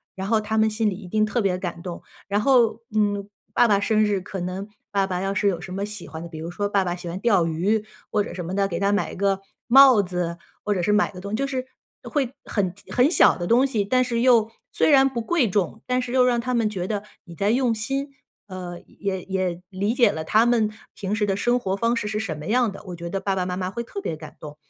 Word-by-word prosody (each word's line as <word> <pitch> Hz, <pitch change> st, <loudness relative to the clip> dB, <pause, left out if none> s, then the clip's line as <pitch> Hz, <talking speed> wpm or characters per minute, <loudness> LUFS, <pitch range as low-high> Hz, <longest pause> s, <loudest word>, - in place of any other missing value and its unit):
然 190 Hz, 0 st, -4 dB
后 220 Hz, +1 st, +3 dB
他 215 Hz, +1 st, -1 dB
们 220 Hz, 0 st, +4 dB
心 215 Hz, 0 st, 0 dB
里 -, -, -4 dB
一 195 Hz, -1 st, -10 dB
定 215 Hz, +3 st, +2 dB
特 220 Hz, +3 st, -1 dB
别 190 Hz, -3 st, +1 dB
感 175 Hz, -2 st, -5 dB
动。 175 Hz, -1 st, -7 dB, 0.2 s
然 200 Hz, +1 st, +1 dB
后 235 Hz, -2 st, +3 dB
嗯， 205 Hz, -1 st, +1 dB, 0.3 s
爸 240 Hz, -, +5 dB
爸 205 Hz, -3 st, +3 dB
生 215 Hz, +1 st, +2 dB
日 205 Hz, -2 st, 0 dB
可 190 Hz, +1 st, -6 dB
能 185 Hz, +3 st, -4 dB, 0.2 s
爸 195 Hz, -1 st, +1 dB
爸 180 Hz, -2 st, -2 dB
要 195 Hz, +1 st, -1 dB
是 200 Hz, +1 st, +1 dB
有 185 Hz, -4 st, +1 dB
什 180 Hz, +1 st, -8 dB
么 195 Hz, -, -3 dB
喜 210 Hz, -4 st, -8 dB
欢 160 Hz, -, -8 dB
的， 170 Hz, -, -7 dB
比 160 Hz, -, -9 dB
如 165 Hz, +2 st, -5 dB
说 205 Hz, +3 st, -2 dB
爸 200 Hz, -1 st, +2 dB
爸 175 Hz, -1 st, -1 dB
喜 175 Hz, -1 st, -7 dB
欢 175 Hz, +3 st, -5 dB
钓 195 Hz, -7 st, +3 dB
鱼 195 Hz, +7 st, +1 dB, 0.3 s
或 210 Hz, -1 st, +2 dB
者 -, -, -7 dB
什 180 Hz, -2 st, -5 dB
么 180 Hz, -, -4 dB
的， 195 Hz, 0 st, +1 dB
给 170 Hz, -3 st, -3 dB
他 200 Hz, +1 st, +2 dB
买 205 Hz, -, 0 dB
一 -, -, -8 dB
个 195 Hz, 0 st, +1 dB, 0.3 s
帽 260 Hz, -4 st, +7 dB
子， 180 Hz, -2 st, -3 dB, 0.3 s
或 205 Hz, -1 st, 0 dB
者 180 Hz, -, -1 dB
是 210 Hz, -, +2 dB
买 210 Hz, 0 st, +3 dB
一 -, -, -15 dB
个 180 Hz, -, -9 dB
东 200 Hz, +2 st, -7 dB
西， -, -, 0 dB
就 275 Hz, +4 st, -1 dB
是 260 Hz, -2 st, -3 dB, 0.4 s
会 275 Hz, -5 st, -1 dB
很 185 Hz, -4 st, -1 dB, 0.2 s
很 250 Hz, +4 st, +5 dB
小 355 Hz, -, +5 dB
的 175 Hz, -, -2 dB
东 245 Hz, +6 st, +4 dB
西， 230 Hz, -7 st, 0 dB
但 255 Hz, +6 st, +2 dB
是 235 Hz, -2 st, -1 dB
又 235 Hz, -3 st, +4 dB, 0.2 s
虽 -, -, +2 dB
然 270 Hz, -1 st, +6 dB
不 240 Hz, -3 st, -3 dB
贵 255 Hz, -, +1 dB
重， 200 Hz, +2 st, -1 dB
但 250 Hz, 0 st, +1 dB
是 245 Hz, -1 st, -5 dB
又 255 Hz, -1 st, +4 dB
让 245 Hz, -1 st, +2 dB
他 250 Hz, +2 st, -2 dB
们 225 Hz, -2 st, +2 dB
觉 185 Hz, -3 st, -4 dB
得 205 Hz, -2 st, -2 dB, 0.2 s
你 170 Hz, -3 st, -11 dB
在 200 Hz, +4 st, +1 dB
用 245 Hz, -1 st, +2 dB
心。 270 Hz, +6 st, -2 dB, 0.4 s
呃， 180 Hz, -2 st, -7 dB, 0.2 s
也 190 Hz, -2 st, -2 dB
也 185 Hz, -2 st, -2 dB
理 200 Hz, +4 st, -1 dB
解 240 Hz, -5 st, +5 dB
了 160 Hz, -3 st, -4 dB
他 215 Hz, +8 st, +3 dB
们 235 Hz, -3 st, +3 dB, 0.2 s
平 200 Hz, +1 st, -3 dB
时 215 Hz, -1 st, +1 dB
的 195 Hz, -1 st, 0 dB
生 240 Hz, +5 st, +1 dB
活 190 Hz, -5 st, -1 dB
方 230 Hz, +4 st, +1 dB
式 210 Hz, -, -2 dB
是 210 Hz, 0 st, -2 dB
什 170 Hz, -8 st, -3 dB
么 150 Hz, -, -8 dB
样 235 Hz, +2 st, +2 dB
的， 195 Hz, -, -9 dB
我 180 Hz, -2 st, -6 dB
觉 170 Hz, 0 st, -6 dB
得 195 Hz, -, -2 dB
爸 195 Hz, 0 st, -1 dB
爸 185 Hz, -, 0 dB
妈 180 Hz, 0 st, -3 dB
妈 185 Hz, 0 st, -3 dB
会 235 Hz, -, -4 dB
特 320 Hz, -, -7 dB
别 165 Hz, -, -3 dB
感 155 Hz, 0 st, -11 dB
动。 150 Hz, -1 st, -9 dB
205 Hz, 295 characters per minute, -24 LUFS, 185-230 Hz, 0.4 s, 帽